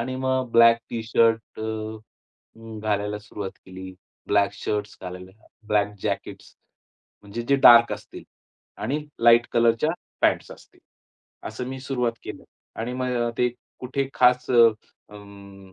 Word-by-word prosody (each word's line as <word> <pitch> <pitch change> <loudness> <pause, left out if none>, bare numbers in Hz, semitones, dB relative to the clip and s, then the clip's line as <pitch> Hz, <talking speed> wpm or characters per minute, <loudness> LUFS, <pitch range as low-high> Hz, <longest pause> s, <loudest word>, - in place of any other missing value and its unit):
आणि 130 +2 -3
मग 130 -1 -1
black 115 0 +6
T-shirt 115 -1 0
अ, - - -4 1.0
अं, 110 -1 -9
घालायला 105 -1 -1
सुरुवात 105 -2 -7 0.2
केली. 95 0 -9 0.3
ब्लॅक 100 -1 +2
शर्ट्स 105 0 -4
घालायला, 90 0 -8 0.4
ब्लॅक 105 -1 +1
जॅकेट्स, - - -5 0.7
म्हणजे 105 +3 -6
जे 140 - +4
डार्क 120 -3 +7
असतील - - -9 0.6
आणि 130 +8 -1 0.2
लाईट 120 0 +6
कलरच्या 115 +5 +2 0.3
पॅन्ट्स - - +2
असतील. - - -19 0.7
असं 125 - -6
मी 130 - -6
सुरुवात 125 -3 -1
केलं - - -8 0.4
आणि 120 +2 -3
मग 125 -2 -1
ते 125 - +3 0.3
कुठे 135 +1 -2
खास 125 0 +3
अ, 120 -2 +7 0.5
अं, 100 -2 -14
115 Hz, 130 wpm, -24 LUFS, 105-125 Hz, 1.0 s, डार्क